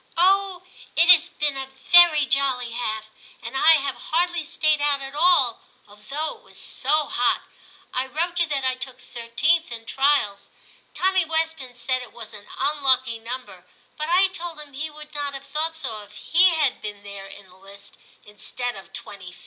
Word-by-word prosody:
'*' - - -37
* - - -21
Oh! 380 0 +2 0.3
it 335 +2 +4
has 350 0 +7
been 295 -2 -2
a 270 0 -5
very 305 +3 +5
jolly 260 -3 0
half, 220 -2 -4 0.3
and 230 +3 -8
I 315 +4 +6
have 280 -3 +1 0.2
hardly 345 0 +1
stayed 305 -1 +1
out 290 -1 +2
at 270 0 -8
all, 300 -7 +3 0.3
although 275 +10 -6
it - - -25
was - - -12
so 300 +3 0
hot. 245 -3 0 0.5
I 255 +1 -1
wrote 340 +6 -2
you 340 - +2
that 280 -3 -1
I 260 - +2
took 255 0 -6
13th 285 +10 0
in 225 -1 -7
trials. 270 -8 +1 0.5
Tommy 375 0 +2
Weston 320 -5 -2
said 255 +1 -1
it 245 - -12
was 235 - -10
an 210 -1 -12
un 295 0 -1
lucky 260 -4 +2
number, 250 +3 -8 0.3
but 305 +1 -4
I 375 +2 +5
told 345 -3 -6
him 295 -2 -11
he 300 +4 -4
would 300 0 -13
not 285 -1 -3
have 275 0 -9
thought 310 +3 -2
so 260 -9 -5
if 205 0 -16
he 350 +5 +4
had 295 -5 +1
been 205 -1 -7
there 200 -1 -9
in 195 0 -13
the 180 - -19
list 195 +1 -14 0.3
instead 245 +4 -5
of 195 - -13
25th.' 185 -3 -8
275 Hz, 190 wpm, -23 LUFS, 240-320 Hz, 0.5 s, has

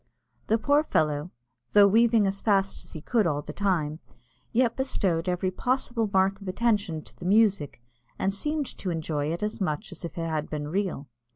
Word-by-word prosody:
The 220 - +3
poor 285 +6 +3
fellow, 150 - 0 0.4
though 205 -1 +8
weaving 225 +1 +4
as 195 0 -1
fast 195 -2 +1
as - - -13
he 155 - -7
could 220 +1 +1
all 145 -2 -1
the - - -7
time, 165 -6 0 0.5
yet 235 0 +2
bestowed 185 -10 0
every 180 +1 0
possible 240 0 0
mark 195 +1 +2
of 195 - -9
attention 200 -5 0
to - - -15
the 175 - -10
music, 200 - +3 0.4
and 195 - 0
seemed 300 +8 -1
to 190 - -3
enjoy 155 -3 -2
it 170 +4 -3
as 210 0 -3
much 155 -1 -2
as 180 - -10
if 170 - -7
it 165 0 -2
had 155 -1 -2
been 150 -1 -4
real. 185 -5 -2
195 Hz, 190 wpm, -27 LUFS, 165-220 Hz, 0.5 s, though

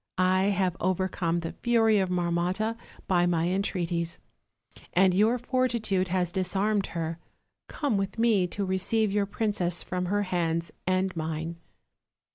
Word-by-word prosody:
I 185 +1 +3
have 190 -3 +1
overcome 180 -2 0
the 165 - -4
fury 225 -3 +3
of 190 -1 0
Marmotta 180 +5 0 0.3
by 175 -2 +3
my 170 -1 +1
entreaties, 175 -3 -1 0.8
and 185 +1 +4
your 215 +6 +3
fortitude 235 -7 0
has 180 -1 0
disarmed 195 +3 0
her; 165 0 -3 0.5
come 280 -9 -1
with 195 +1 -3
me 220 -5 +3
to 200 +3 -3
receive 195 +3 +1
your 200 0 +1
princess 200 -5 -1
from 180 0 -3
her 205 +2 +1
hands 170 -3 -1 0.2
and 185 0 +1
mine." 160 +1 -3
185 Hz, 135 wpm, -27 LUFS, 175-205 Hz, 0.8 s, and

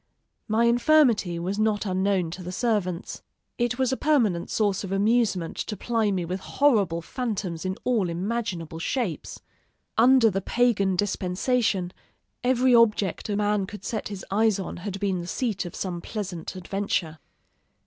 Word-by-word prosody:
My 225 +1 +2
infirmity 235 - +4
was 185 +5 -3
not 215 -1 +1
unknown 190 -2 0
to 185 - -7
the 180 0 -6
servants. 190 -4 -1 0.4
It 240 0 0
was 260 -1 +1
a - - +1
permanent 225 - +1
source 205 -3 0
of 195 - -6
amusement 200 -3 +1
to 210 - -4
ply 225 -3 0
me 185 -3 -1
with 185 +3 -3
horrible 200 - +2
phantoms 195 -8 -3
in 185 0 -2
all 225 -8 +1
imaginable 175 -3 -3
shapes. 210 - -3 0.6
Under 245 -1 +6
the 195 +1 -1
pagan 200 -4 +2
dispensation, 195 0 0 0.5
every 255 0 +3
object 215 -5 +3
a 205 - 0
man 205 -1 +1
could 205 -1 -9
set 220 - -3
his 200 -2 -7
eyes 215 0 +3
on 190 - -5
had 195 +2 -5
been 190 -3 -1
the 175 - -7
seat 215 -3 -2
of - - -9
some 175 -3 -4
pleasant 190 -5 -5
adventure. 185 -4 -2
200 Hz, 155 wpm, -25 LUFS, 185-230 Hz, 0.6 s, Under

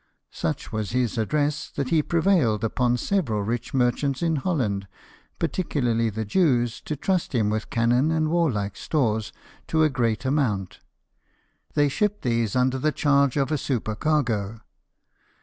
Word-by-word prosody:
Such - - -3
was 110 0 -3
his 125 -4 0
address 150 +5 0
that 140 -3 -3
he 160 -2 +3
prevailed 160 - +2
upon 120 +2 +1
several 120 - 0
rich 115 +3 -3
merchants 130 +3 0
in 165 -2 +1
Holland, 120 - -1 0.5
particularly 125 -10 0
the 110 +1 -4
Jews, 120 - +1
to 155 - -2
trust 180 0 -1
him 105 -3 +2
with 110 0 -3
cannon 120 +5 +2
and 160 -1 +1
warlike 120 - 0
stores 110 -8 0 0.4
to 160 -1 +2
a 155 - +3
great 120 -2 0
amount. 120 -10 0 1.0
They 145 -1 +4
shipped 210 +7 -1
these 115 -4 0
under 130 +1 +2
the 155 +3 +1
charge 140 -2 +2
of 140 +1 +1
a 150 - +1
supercargo. 115 -3 -1
130 Hz, 145 wpm, -25 LUFS, 115-150 Hz, 1.0 s, They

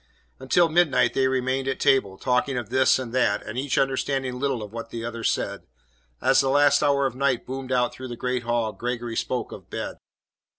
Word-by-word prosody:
Until 150 +6 +3
midnight 155 -6 +3
they 135 -1 +2
remained 130 0 -1
at 135 - -2
table, 100 -8 +2
talking 125 +3 0
of 120 -2 -5
this 130 0 +4
and 125 -3 -6
that, 125 -5 +1
and 105 - -6
each 135 +2 -1
understanding 135 -1 0
little 135 -5 -1
of 105 0 -10
what 115 0 -6
the 115 0 -5
other 115 -1 -5
said. - - -1 0.5
As 135 - +4
the 135 - 0
last 145 +1 +4
hour 140 -2 +2
of 135 - -1
night 130 -1 0
boomed 130 0 -6
out 125 -1 +1
through 130 - -8
the 120 - -6
great 125 0 -1
hall, 115 -2 -1
Gregory 120 -1 -4
spoke - - -2
of - - -11
bed. - - -5
130 Hz, 205 wpm, -25 LUFS, 120-135 Hz, 0.5 s, this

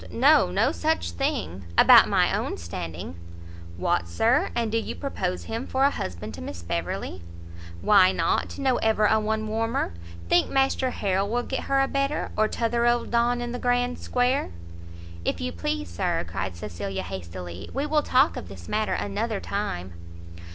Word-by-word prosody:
no, - - +5
no 90 - +2
such 85 0 0
thing; 85 +1 -2
about - - +8
my - - +3
own - - -2
standing." 85 0 -6 0.6
"What, 85 0 0
Sir, 225 - +2
and 230 -2 0
do 225 - +2
you - - -5
propose 185 -10 -3
him 230 +3 -4
for 265 +1 +2
an 280 - +4
husband 105 - -5
to 85 - -8
Miss 85 0 -7
Beverley?" 85 +2 -3 0.6
"Why 190 -3 +6
not? - - 0
know 265 -3 +2
ever 220 -1 +2
a 220 +1 +4
one 215 0 -1
warmer? 225 - -1 0.3
think 175 - +3
Master 270 -1 +2
Harrel 195 -3 -1
will 245 +2 0
get 265 - -4
her 275 0 +2
a 270 - +2
better? 275 +2 -1
or 215 0 +3
t'other 235 +1 0
old 240 0 +1
Don, 240 +1 +2
in 240 0 -3
the 245 - -4
grand 245 0 0
square?" 250 +2 0 0.7
"If 85 - -1
you 85 0 -2
please, 100 +4 -3
Sir," 85 0 -1
cried 95 +1 -4
Cecilia 95 +1 -5
hastily, 90 0 -7
"we 275 +2 -2
will 300 0 +2
talk 265 +1 +3
of - - -6
this 90 -3 -11
matter 215 0 0
another 210 +1 -2
time." 95 - -4
210 Hz, 170 wpm, -25 LUFS, -, 0.7 s, about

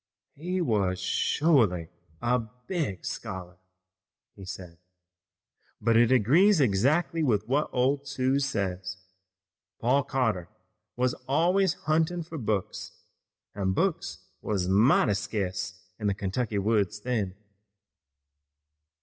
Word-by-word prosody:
"He 180 +5 -3
wuz 105 - +1
shorely 110 - +2 0.3
a 125 +1 +2 0.3
big 145 - -3
scholar," 95 -1 -6 0.8
he 95 - -10
said, 90 -3 -9 1.0
"but 115 +1 +2
it 120 +1 +5
agrees 155 - +5
exactly 140 - +2
with 110 -8 +1
what 145 +4 +1
old 130 +3 +2
Aunt 140 - -18
Suse 135 +1 +1
says. 95 -3 -3 0.8
Paul 130 +4 +3
Cotter 115 -11 -1 0.5
was 125 0 +1
always 175 +6 +2
huntin' 160 +3 0
fur 160 -1 -7
books, 105 -5 -3 0.6
an' 95 -2 -1
books 155 - -1 0.2
wuz 95 -4 -1
mighty 105 +4 +4
sca'ce 95 -3 -3 0.2
in 105 - -1
the 100 - +1
Kentucky 105 +3 -2
woods 105 -1 +1
then." 105 -6 -2
115 Hz, 110 wpm, -28 LUFS, 95-140 Hz, 1.0 s, it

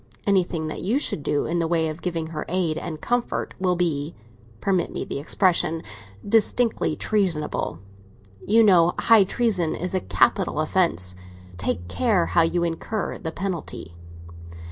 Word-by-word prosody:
Anything 180 -5 +1
that 155 - -5
you 215 +8 +1
should 285 - 0
do 145 0 0
in 170 +1 -1
the 165 - 0
way 165 -1 +1
of 155 +2 -6
giving 165 -3 -2
her 150 - -3
aid 175 -3 0
and 155 -1 -5
comfort 245 0 -2
will 180 -1 +1
be—permit 140 - -3
me - - -4
the - - -4
expression—distinctly 165 - 0
treasonable. 180 - -1 0.7
You 225 +2 +4
know 180 -4 +5
high 225 -4 +5
treason 190 -6 0
is 180 +2 -4
a 185 - +2
capital - - +1
offence; 90 +4 +1 0.5
take 90 -2 -2
care 200 - +1
how 170 - +2
you 170 +1 +1
incur 170 +6 -3
the 160 - -4
penalty." 175 - -5
170 Hz, 145 wpm, -24 LUFS, 155-195 Hz, 0.7 s, know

